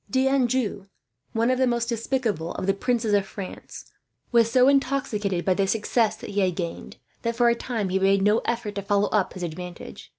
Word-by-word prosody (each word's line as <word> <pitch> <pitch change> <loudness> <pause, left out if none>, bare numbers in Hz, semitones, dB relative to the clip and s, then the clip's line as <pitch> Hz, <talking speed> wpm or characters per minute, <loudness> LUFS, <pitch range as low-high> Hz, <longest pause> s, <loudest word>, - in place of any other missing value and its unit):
D'Anjou, 260 -6 +1 0.5
one 230 +2 +2
of 255 - 0
the 260 - +3
most 235 -1 0
despicable 230 - -1
of - - -4
the 195 - +2
princes 230 +1 0
of 200 -1 +4
France, 195 -2 -8 0.5
was 230 -2 +4
so 250 +1 +5
intoxicated 240 -9 +1
by 190 - +3
the 195 +1 0
success 220 +1 +1
that 220 - -9
he 205 - -1
had 185 -2 +1
gained 170 -2 -5 0.2
that, 230 0 -2
for 240 0 +4
a - - +4
time, 230 -4 -3
he 190 +1 +1
made 195 0 +3
no 210 +3 +4
effort 230 -3 -3
to 200 - -3
follow 205 0 +1
up 210 -3 0
his 185 - -7
advantage. 175 - -7
215 Hz, 200 wpm, -25 LUFS, 195-240 Hz, 0.5 s, so